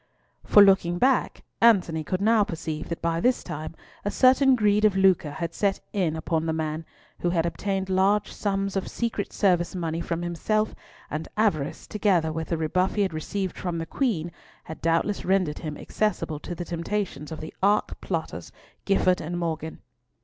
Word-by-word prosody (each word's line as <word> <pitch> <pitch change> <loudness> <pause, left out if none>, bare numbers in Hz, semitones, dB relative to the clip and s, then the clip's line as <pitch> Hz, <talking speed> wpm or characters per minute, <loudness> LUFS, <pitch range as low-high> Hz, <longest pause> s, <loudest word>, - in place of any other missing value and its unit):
For 205 - +7
looking 185 -3 +4
back, 260 +5 +1 0.2
Antony 180 -9 +4
could 185 +5 -2
now 220 0 +4
perceive 160 -4 -5
that 170 - -5
by 165 0 +1
this 250 +6 +2
time 155 +2 -6 0.3
a 205 - -1
certain 260 +3 +5
greed 210 -2 +2
of 205 -3 +4
lucre 190 -5 +4
had 165 +3 -4
set 200 -2 0
in 180 -6 0
upon 160 0 -1
the 160 - 0
man, 160 0 -3 0.3
who 175 - 0
had 170 -1 +1
obtained 190 +3 -2
large 190 +2 +2
sums 195 -1 -2
of 195 - -1
secret 230 -4 -3
service 180 -3 +1
money 165 -2 -2
from 170 0 -3
himself; 215 +6 0 0.4
and 155 +2 -3
avarice, 160 -8 0
together 185 -7 +1
with 160 0 -4
the 170 - -1
rebuff 180 +4 0
he 205 - +2
had 190 -4 -2
received 185 +4 -3
from 175 -2 -3
the 165 - -3
Queen, 175 - -1 0.3
had 160 - -9
doubtless 165 +5 +1
rendered 185 -5 +1
him 150 -2 -5
accessible 210 -8 -2
to 175 - -6
the 175 - -5
temptations 170 -2 -3
of 160 - -6
the 155 - -8
arch 205 +2 +3
plotters 160 - -4 0.3
Gifford 185 -2 +2
and 175 +3 -4
Morgan. 160 -2 -4
175 Hz, 180 wpm, -26 LUFS, 160-205 Hz, 0.4 s, For